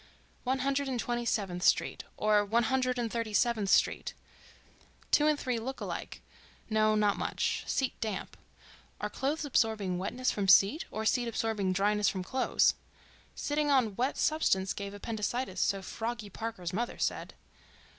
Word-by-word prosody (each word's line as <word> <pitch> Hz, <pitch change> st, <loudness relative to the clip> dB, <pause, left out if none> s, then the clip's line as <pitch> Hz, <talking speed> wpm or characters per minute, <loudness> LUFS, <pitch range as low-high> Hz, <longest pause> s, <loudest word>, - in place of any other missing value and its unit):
One 260 Hz, +1 st, 0 dB
Hundred 275 Hz, 0 st, +1 dB
and 255 Hz, -2 st, -2 dB
Twenty 240 Hz, 0 st, -2 dB
seventh 190 Hz, -6 st, -1 dB
Street—or 210 Hz, +3 st, +2 dB
One 225 Hz, +4 st, +2 dB
Hundred 255 Hz, +1 st, +1 dB
and 235 Hz, -2 st, -2 dB
Thirty 230 Hz, -2 st, -3 dB
seventh 225 Hz, -5 st, +2 dB
Street.... -, -, +2 dB, 1.0 s
Two 300 Hz, -, +5 dB
and 300 Hz, -1 st, +2 dB
three 250 Hz, -3 st, -1 dB
look 265 Hz, +4 st, -5 dB
alike—no, 215 Hz, -1 st, -3 dB
not 210 Hz, -1 st, +2 dB
much. -, -, -1 dB
Seat 265 Hz, -2 st, 0 dB
damp... 215 Hz, -4 st, -4 dB, 0.6 s
are -, -, -3 dB
clothes 295 Hz, +3 st, -2 dB
absorbing 220 Hz, -9 st, +1 dB
wetness 250 Hz, +7 st, -1 dB
from 200 Hz, -2 st, -2 dB
seat, 200 Hz, -, +5 dB
or 220 Hz, 0 st, -4 dB
seat 240 Hz, +1 st, +2 dB
absorbing 220 Hz, -4 st, -1 dB
dryness 205 Hz, +2 st, +2 dB
from 185 Hz, -2 st, -3 dB
clothes?... 260 Hz, +7 st, +2 dB, 0.6 s
Sitting 295 Hz, 0 st, -1 dB
on 250 Hz, -8 st, +3 dB
wet 255 Hz, +5 st, 0 dB
substance 195 Hz, -12 st, +1 dB
gave 200 Hz, 0 st, -6 dB
appendicitis, 215 Hz, 0 st, -3 dB
so 195 Hz, -1 st, +1 dB
Froggy 225 Hz, 0 st, -5 dB
Parker's 195 Hz, -5 st, -5 dB
mother 235 Hz, +5 st, -2 dB
said. -, -, -2 dB
225 Hz, 145 wpm, -30 LUFS, 205-255 Hz, 1.0 s, Two